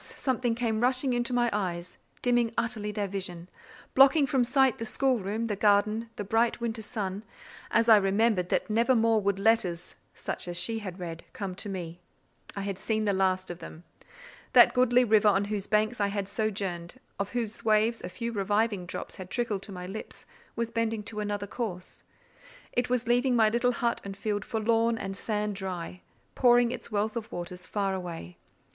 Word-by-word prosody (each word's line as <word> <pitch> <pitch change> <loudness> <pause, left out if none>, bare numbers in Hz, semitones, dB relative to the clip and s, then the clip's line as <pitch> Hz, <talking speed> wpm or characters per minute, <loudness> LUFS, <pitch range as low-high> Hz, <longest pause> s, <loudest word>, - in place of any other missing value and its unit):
something 245 -3 0
came 230 -2 -1
rushing 255 +1 +2
into 240 0 -1
my 240 -1 +2
eyes, 180 -4 -3 0.2
dimming 240 -2 +2
utterly 225 -3 -1
their 205 -1 -2
vision, 180 -3 -5 0.5
blotting 275 +2 +6
from 265 -1 +2
sight 260 0 +3
the - - -3
schoolroom, 230 -3 0
the 215 -3 -1
garden, 210 +2 +2
the - - -4
bright 225 +4 +1
winter 230 -1 -3
sun, 205 -2 -4 0.5
as 230 - +2
I 220 -2 +9
remembered 195 -1 +2
that - - 0
never 230 +4 +3
more 225 -1 +3
would 200 -1 0
letters, 195 -5 +1 0.2
such - - -5
as 175 0 -1
she 225 -1 -1
had 190 -4 -7
read, 165 -2 -6
come 195 -3 -4
to 205 +3 -5
me. 175 -3 -6 0.6
I 200 - -3
had 195 -1 -4
seen 220 +1 -1
the 200 - +2
last 185 -1 +1
of 175 - -8
them. 165 0 -10 0.7
That - - +8
goodly 250 0 +4
river 215 -2 +4
on 200 -1 +3
whose 205 -1 -3
banks 215 +2 +1
I 200 - +3
had 200 -1 -3
sojourned, 200 -1 -3 0.2
of 200 +2 -3
whose 230 -2 -3
waves 220 +1 +2
a - - -5
few 235 +5 -4
reviving 205 -2 0
drops - - -6
had 185 -1 -8
trickled 225 -4 -1
to 205 - -7
my 180 -1 -6
lips, 195 +4 -7 0.3
was 230 0 -2
bending 225 -1 -1
to 210 0 -5
another 205 -1 -2
course: 200 -4 -6 0.7
it 245 0 0
was 250 -1 0
leaving 245 +1 +3
my 220 -2 +5
little 240 +2 +2
hut 235 0 -1
and 195 0 -7
field 205 0 -2
forlorn 225 0 +1
and 195 -2 -5
sand 210 0 -2
dry, 185 -2 -5 0.3
pouring 245 -1 +4
its 250 - -7
wealth 210 +1 0
of 230 -1 -5
waters 180 +1 -6
far 200 -2 -1
away. 170 - -6
215 Hz, 185 wpm, -28 LUFS, 195-235 Hz, 0.7 s, I